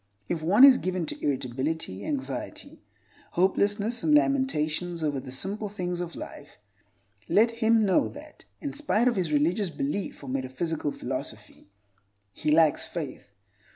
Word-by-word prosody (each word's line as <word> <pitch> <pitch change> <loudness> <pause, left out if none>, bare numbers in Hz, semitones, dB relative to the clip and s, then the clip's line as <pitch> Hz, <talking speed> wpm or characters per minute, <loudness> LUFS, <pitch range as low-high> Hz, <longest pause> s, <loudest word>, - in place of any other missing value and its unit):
If 165 - -2
one 195 +10 +5
is 265 -2 +7
given 185 -2 -2
to - - -6
irritability, 130 -5 -2
anxiety, 135 -2 -5 0.5
hopelessness, 205 +5 +1
and 300 - +4
lamentations 175 - +1
over 145 -3 0
the 130 0 -9
simple 200 +10 -2
things 180 -3 -4
of 170 -1 -5
life, 145 - -10 0.7
let 230 +3 +4
him 225 -1 +3
know 190 - +3
that, - - -12 0.2
in 285 -2 -4
spite 270 -6 +1
of 245 - +2
his 180 -5 -1
religious 170 +7 +1
belief 145 +4 -4
or - - -8
metaphysical 135 +4 -2
philosophy, - - -7 0.6
he - - -3
lacks 155 -1 +4
faith. 150 -10 -7
175 Hz, 140 wpm, -27 LUFS, 145-210 Hz, 0.7 s, is